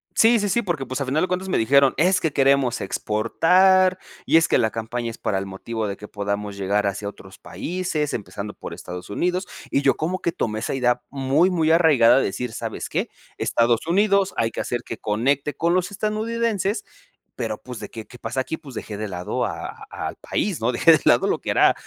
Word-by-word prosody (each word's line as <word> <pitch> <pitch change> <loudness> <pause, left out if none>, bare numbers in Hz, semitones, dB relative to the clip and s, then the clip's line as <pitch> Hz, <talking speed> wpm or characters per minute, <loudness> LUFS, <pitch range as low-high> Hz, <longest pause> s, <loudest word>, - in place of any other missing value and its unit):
Sí, 230 +1 +5
sí, 205 - 0
sí, 235 +5 +1
porque, 170 - -2
pues, 130 +3 -4
al 135 - -2
final 150 +6 +1
de - - +1
cuentas 185 +1 -2
me - - +1
dijeron: 135 +4 +4
"Es 180 +4 +3
que 160 - 0
queremos 135 -3 +2
exportar, 180 - +3 0.3
y 165 - +5
es 165 - +4
que - - +3
la 110 - +2
campaña 115 +2 -4
es 115 - -8
para 95 - -1
el 95 - -4
motivo 110 +3 -4
de 100 - -4
que 105 - -10
podamos 100 0 -3
llegar 100 +1 0
hacia 100 +1 -2
otros 95 -1 -14
países, 170 -4 -3
empezando 100 +1 -5
por - - -8
Estados 90 +1 -8
Unidos". 180 - -1 0.2
Y 140 - +2
yo 140 - +3
como 180 +4 -2
que 170 - -1
tomé 110 -6 -2
esa 115 - -2
idea 125 -1 +1
muy 140 +6 +2
muy 160 -3 +2
arraigada 155 -9 +5
de - - +1
decir: 125 +5 -3
"¿Sabes - - -5
qué?, - - -1 0.3
Estados 115 +5 +1
Unidos, 200 +1 +3
hay 115 0 +1
que - - -3
hacer 120 - -3
que 115 - -6
conecte 135 +7 0
con 170 +1 +1
los 185 0 +1
estadounidenses", 215 0 -1 0.5
pero, 110 -3 -3
pues, 125 -2 -8
de 105 - -7
que, 110 -2 -8
¿qué 125 - -14
pasa 120 +4 -2
aquí?, 145 +5 -4
pues 140 -6 -12
dejé 105 -2 -6
de 110 - -3
lado 90 -2 -2
a - - -4 0.2
a - - -5
al - - -9
país, 195 - -2
¿no? 115 - +2
Dejé 165 +7 +5
de 160 - +6
lado - - +5
lo - - 0
que - - -6
era, - - +5
135 Hz, 220 wpm, -23 LUFS, 110-180 Hz, 0.5 s, de